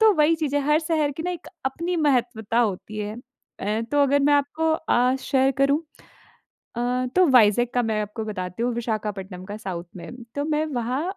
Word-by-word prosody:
तो 440 -1 +7
वही 305 +2 +4
चीज़ 305 -3 -2
है - - +3
हर 300 +1 +5
शहर 310 -3 0
की 320 - -4
ना 360 - -2
एक 350 -2 -7 0.2
अपनी 335 +6 -2
महत्वता 240 -7 +1
होती 215 -1 -2
है। 210 0 -3 0.5
अ, 210 +3 -1
तो 290 0 +4
अगर 280 +1 +3
मैं 290 +1 +3
आपको 310 +3 +1
अ, 255 -5 +2
शेयर 265 -1 +2
करूँ 280 +3 +3 0.9
अ, 250 +1 0
तो 370 0 +6
वाइजेक 240 -1 +5
का 245 - +3
मैं 220 -2 0
आपको 210 +2 -5
बताती 185 0 -4
हूँ 245 - 0
विशाखापट्टनम 210 -5 -4
का 205 +2 -6
साउथ 180 -5 -5
में। 240 +7 -9
तो 285 - 0
मैं 305 0 0
वहाँ 245 +4 -1
250 Hz, 195 wpm, -24 LUFS, 215-300 Hz, 0.9 s, तो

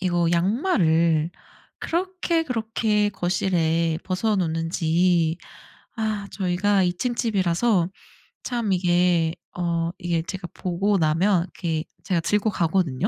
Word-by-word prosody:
이거 175 -3 +1
양말을 170 - +2 0.5
그렇게 350 -1 -1
그렇게 220 -5 0
거실에 170 -3 0
벗어 200 +4 0
놓는지 165 0 +1 0.6
아 215 -3 -2
저희가 195 +1 +1
2 175 -1 +1
층 250 -1 -1
집이라서 195 -3 +1 0.6
참 235 -4 -2
이게 175 -2 +2 0.2
어 170 -1 0
이게 170 -1 -1
제가 185 +1 -6
보고 195 +3 0
나면 170 +4 +3
이렇게 165 -4 -3 0.2
제가 180 -3 0
들고 210 +5 +1
가거든요. 170 -2 0
180 Hz, 235 characters per minute, -24 LUFS, 170-210 Hz, 0.6 s, 나면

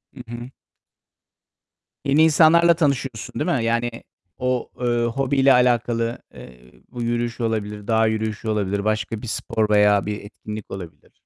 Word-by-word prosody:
Hı - - -9
hı. 120 +1 -7 1.6
Yeni 145 +3 +4
insanlarla 165 +2 +6
tanışıyorsun, 135 -8 -2
değil - - 0
mi? 115 - -2
Yani 115 +1 0 0.5
o, 125 -1 -1
eee, 120 -1 +1
hobiyle 135 +2 +3
alakalı, 120 -1 +1
eee, 60 0 -13 0.3
bu 120 - -6
yürüyüş 120 0 -2
olabilir, 105 -2 -3
dağ 110 -1 +3
yürüyüşü 110 0 -2
olabilir, 100 -1 -1
başka 110 0 -1
bir 120 - -7
spor 110 0 -1
veya 105 -1 +4
bir 105 0 -4
etkinlik 105 +1 -9
olabilir. 85 -6 -9
115 Hz, 140 wpm, -22 LUFS, 105-125 Hz, 1.6 s, insanlarla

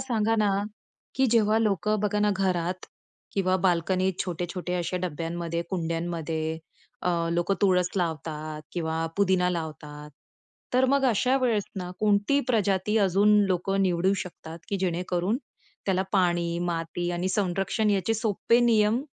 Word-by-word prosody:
सांगा 225 -3 0
ना, 210 -1 +3 0.7
की 265 - +2
जेव्हा 220 -1 +4
लोकं 215 0 +1
बघा 210 0 0
ना, 210 0 +3
घरात 185 -1 -1 0.5
किंवा 185 -1 +1
बाल्कनीत 185 +1 +1
छोटे-छोटे 180 0 -4
अशा 175 +1 -2
डब्यांमध्ये, 170 0 -3
कुंड्यांमध्ये 165 -2 -2 0.4
अ, 180 - +1 0.2
लोकं 175 +3 +1
तुळस 180 -2 +3
लावतात 155 -2 -3
किंवा 165 -1 -2
पुदिना 185 -2 +3
लावतात, 150 -3 -6 0.6
तर 255 +1 +4
मग 280 -1 +3
अशा 255 +2 +3
वेळेस 230 -6 +1
ना 180 -1 -4
कोणती 210 +6 +3
प्रजाती 210 -2 +1
अजून 200 +2 +4
लोकं 195 +1 0
निवडू 185 +1 +2
शकतात, 165 -2 -10
की 200 - -1
जेणेकरून 180 +3 0 0.5
त्याला 190 -1 +2
पाणी, 175 -3 +1
माती 175 0 -2
आणि 175 +2 -1
संरक्षण 195 +2 0
याचे 200 +2 +1
सोपे 225 +2 +2
नियम 230 +1 +3
185 Hz, 130 wpm, -26 LUFS, 170-210 Hz, 0.7 s, जेव्हा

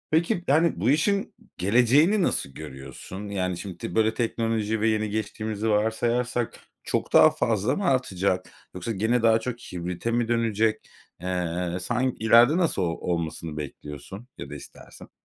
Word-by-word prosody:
Peki, 170 +2 +1
yani 155 - +3
bu 110 +7 +1
işin 195 +8 +1 0.2
geleceğini 125 - +4
nasıl 70 - 0
görüyorsun? 65 +9 -9
Yani, 90 -3 -2
şimdi, 90 -2 -7
böyle 110 0 +3
teknoloji 110 -2 -1
ve 110 - +3
yeni 110 -1 0
geçtiğimizi 110 +1 -3
varsayarsak, 115 +3 0 0.2
çok - - -2
daha - - +8
fazla 110 +2 0
mı 200 - -2
artacak? 95 - +1 0.3
Yoksa 105 +6 -4
gene 110 +3 +1
daha 115 -1 +5
çok 120 +1 -5
hibrite 90 +4 -4
mi 120 0 +1
dönecek? 115 -2 0 0.3
Eee, 90 -1 -2
san 125 +6 0
ileride 115 +7 +6
nasıl 170 - +1
o - - +2
olmasını 80 -2 -3
bekliyorsun 75 - -8
ya - - -7
da - - -7
istersin? - - -13
110 Hz, 145 wpm, -25 LUFS, 90-120 Hz, 0.3 s, daha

